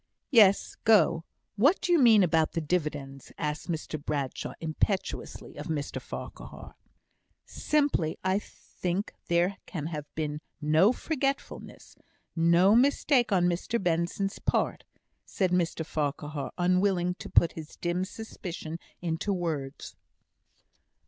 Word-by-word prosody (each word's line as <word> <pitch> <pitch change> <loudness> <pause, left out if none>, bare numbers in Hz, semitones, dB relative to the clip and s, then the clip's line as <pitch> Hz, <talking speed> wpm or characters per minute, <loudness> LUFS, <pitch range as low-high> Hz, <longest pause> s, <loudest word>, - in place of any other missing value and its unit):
"Yes. 205 -6 +5
Go. 170 -6 +4 0.3
What 280 - +4
do 355 - -1
you 340 - +5
mean 225 -6 +7
about 160 -2 +2
the 170 - 0
dividends?" 145 -5 -3
asked 150 +3 -3
Mr 155 -2 -4
Bradshaw, 140 -4 -3
impetuously 165 +5 -3
of - - -6
Mr 150 -3 -3
Farquhar. - - -9 0.7
"Simply, 285 - 0
that - - -1
I 195 - +2
think 185 -1 -5
there 175 +3 +2
can 155 -5 -5
have 150 -2 -5
been 150 -1 -3 0.2
no 155 +7 +4
forgetfulness 275 0 -4 0.4
no 170 +5 +5
mistake 255 -1 +3
on 180 -3 +3
Mr 175 +6 0
Benson's 175 +3 -1
part," - - 0 0.4
said 185 -3 -1
Mr 170 -2 0
Farquhar, 150 -1 -3
unwilling 180 0 +2
to - - -8
put 170 - +4
his 160 -1 -9
dim 175 +1 -1
suspicion 180 -6 -7 0.2
into 170 +4 -1
words. 155 -7 -3
175 Hz, 120 wpm, -28 LUFS, 155-200 Hz, 0.7 s, mean